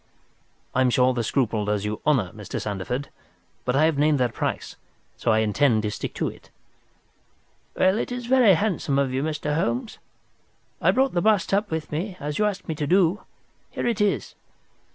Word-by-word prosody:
"I 130 - +2
am 130 - +4
sure 125 +1 +3
the 120 -2 -1
scruple 115 -3 0
does 105 -1 -1
you 105 0 -3
honour, 120 -12 +2
Mr. 105 -1 -6
Sandeford. 105 +7 -4 0.6
But 125 - 0
I 150 +3 +4
have 160 -3 +1
named 150 -1 +3
that 125 -2 +1
price, - - -3 0.4
so - - -2
I 110 0 +3
intend 110 +1 +2
to 105 - -1
stick - - -5
to - - -1
it." - - -10 1.3
"Well, 190 +3 +3
it - - -3
is 245 -1 -4
very 245 -6 +5
handsome 165 -7 0
of 135 -2 +1
you, 130 - 0
Mr. 150 -1 -2
Holmes. 220 - -2 0.8
I - - +3
brought 265 0 +2
the 175 - +1
bust 210 -1 +2
up 205 +2 +1
with 160 -1 -4
me, 180 +5 -3
as 150 +3 -4
you 210 - +3
asked 200 -1 -3
me 160 - -1
to 150 -1 -3
do. 185 +3 +3 0.5
Here - - -4
it 230 -3 0
is!" 205 -1 0
150 Hz, 195 wpm, -24 LUFS, 125-195 Hz, 1.3 s, very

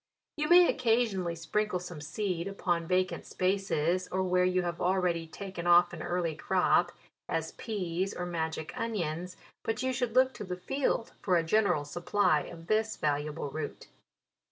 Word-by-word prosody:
You 300 0 -1
may 350 0 +8
occasionally 225 -8 +1
sprinkle 200 +4 -1
some 175 -3 -8
seed 175 +2 -2
upon 175 -4 -1
vacant 185 +1 0
spaces, 185 -2 0
or 190 +1 0
where 180 0 +2
you 185 0 +2
have 170 -1 -3
already 180 -2 +1
taken 185 0 -6
off 175 0 +6
an 170 - -6
early 175 -2 -1
crop, 175 +1 +2 0.4
as 160 0 -1
peas, 190 -3 -3
or 180 - -4
magic 160 -2 -3
onions; 180 -5 -3 0.2
but 225 +3 -2
you 260 0 0
should 245 -2 -2
look 260 0 +5
to - - -7
the 180 -2 -5
field 245 +4 -1
for 180 -3 +3
a 165 - +2
general 180 -4 +2
sup 175 +4 -8
ply 185 -7 +3
of 165 -1 -10
this 215 +3 +1
valuable 145 0 -1
root. 155 +1 -6
180 Hz, 165 wpm, -30 LUFS, 170-205 Hz, 0.4 s, may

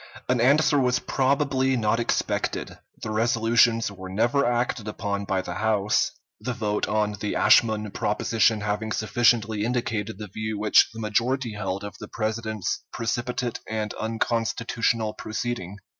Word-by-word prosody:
An 125 -2 +2
answer 145 +3 +4
was 125 -1 +2
probably 135 -1 +1
not 110 0 +1
expected; 120 - -1 0.2
the 110 - -3
resolutions 115 0 +3
were 95 -1 -9
never 120 +8 +2
acted 120 -2 -1
upon 100 -1 -3
by 95 -1 -1
the 90 - -5
House, 105 +1 +1 0.3
the 125 +4 -3
vote 105 -3 -1
on 105 -1 0
the 105 -1 -2
Ashmun 110 -3 +4
proposition 110 +1 +1
having 105 +1 -2
sufficiently 110 0 +2
indicated 115 -3 -2
the 105 - -6
view 110 +2 -4
which 105 0 +5
the 115 - -9
majority 115 +3 0
held 100 -1 -3
of 105 - -8
the 105 - -8
President's 110 -2 -3
precipitate 120 +1 -2
and 110 -1 -2
unconstitutional 115 0 -1
proceeding. 110 -3 -4
110 Hz, 140 wpm, -25 LUFS, 105-120 Hz, 0.3 s, which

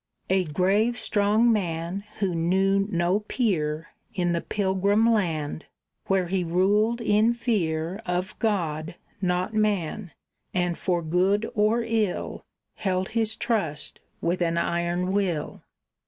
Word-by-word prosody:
A 190 -1 +3
grave, 195 +9 +1
strong 220 +1 +3
man, 175 0 -2
who 195 -4 0
knew 190 +4 +2
no 175 +1 +1
peer 165 -9 -1 0.3
In 175 -2 +1
the 170 -1 0
pilgrim 200 +2 +1
land, 160 -9 0 0.4
where 190 -1 +2
he 185 +1 -1
ruled 205 +7 +2
in 220 +1 +3
fear 185 -6 -1
Of 180 +1 -2
God, 170 -7 -1 0.3
not 180 +3 0
man, 210 -3 0 0.5
and 175 -1 +1
for 175 -1 -1
good 190 +7 +2
or 215 +3 +2
ill 225 -4 -1 0.3
Held 185 -2 -1
his 220 -1 +1
trust 180 -12 -2 0.2
with 175 +2 0
an 170 -1 +1
iron 170 +2 0
will. 190 -6 -1
190 Hz, 125 wpm, -26 LUFS, 170-210 Hz, 0.5 s, A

